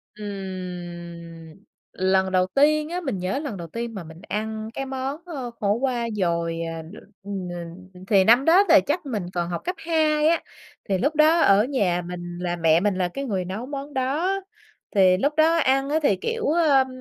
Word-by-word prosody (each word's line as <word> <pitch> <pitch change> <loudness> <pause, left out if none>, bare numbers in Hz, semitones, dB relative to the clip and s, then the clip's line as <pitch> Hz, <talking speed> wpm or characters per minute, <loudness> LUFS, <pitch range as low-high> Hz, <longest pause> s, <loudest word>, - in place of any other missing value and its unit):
Ừm. 175 -5 -7 0.4
Lần 190 0 +1
đầu 185 0 +2
tiên 305 +2 +3
á, 355 +1 -3
mình 265 - -3
nhớ 185 +10 -2
lần 280 -10 -5
đầu 170 -2 -7
tiên 230 +5 -5
mà 190 -4 -6
mình 160 +2 -12
ăn 220 +1 -3
cái 270 - -4
món, 265 +2 -4
ơ, 270 -9 -6
khổ 205 -1 +2
qua 240 -1 -1
dồi, 170 -3 -1
à, 165 -1 -4
đ 165 +6 -12 0.3
ừm, 195 -2 -5
n 180 +2 -9
thì 195 -2 +5
năm 240 +6 +5
đó 355 +5 +6
là 315 -2 +8
chắc 295 +1 -1
mình 215 -9 -3
còn 175 -1 -2
học 170 - -3
cấp 360 +2 -3
2 310 -2 +2
á. 335 0 +3 0.5
Thì 190 - +2
lúc 290 +10 0
đó 315 +2 +5
ở 200 -4 +5
nhà 200 -9 0
mình 175 -1 -6
là 175 -1 -1
mẹ 165 -1 +3
mình 200 0 +1
là 185 -1 0
cái 275 +11 -5
người 190 -7 -2
nấu 205 +7 -5
món 280 +1 -6
đó, 280 +8 0 0.6
thì 185 -2 +5
lúc 285 +8 +1
đó 320 +2 +5
ăn 270 -2 +2
á, 310 +2 +2
thì, 205 -9 +4
kiểu, 460 - -3
ơm 295 -5 +4
210 Hz, 200 wpm, -24 LUFS, 180-285 Hz, 0.6 s, là